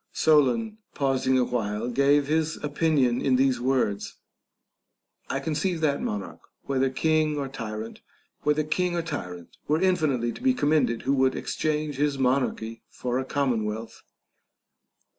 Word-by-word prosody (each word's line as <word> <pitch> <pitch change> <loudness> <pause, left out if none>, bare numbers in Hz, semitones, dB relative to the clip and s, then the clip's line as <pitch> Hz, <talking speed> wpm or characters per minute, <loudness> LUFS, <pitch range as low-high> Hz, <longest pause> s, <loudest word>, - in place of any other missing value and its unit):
Solon, 160 - +2 0.2
pausing 130 -2 +1
awhile, 115 -3 -1
gave 140 +3 +3
his 160 +2 0
opinion 145 -5 +1
in 130 -2 +2
these 130 -2 +2
words. 125 -6 0 1.1
I 135 - -1
conceive 160 +5 -1
that 145 -2 +1
monarch, 100 -2 -4 0.2
whether 135 -1 +1
king 155 +2 +1
or 140 -1 -2
tyrant, 110 -4 -6 0.4
were 150 0 +3
in 155 - +1
finitely 155 - -1
to - - -11
be 260 0 +3
commended, 150 - +1
who 135 - +1
would 130 -1 +2
exchange 150 -2 -2
his 145 -1 +1
monarchy 125 -4 0
for 125 0 -2
a 130 - -3
commonwealth. 115 -6 -2
135 Hz, 125 wpm, -26 LUFS, 125-155 Hz, 1.1 s, gave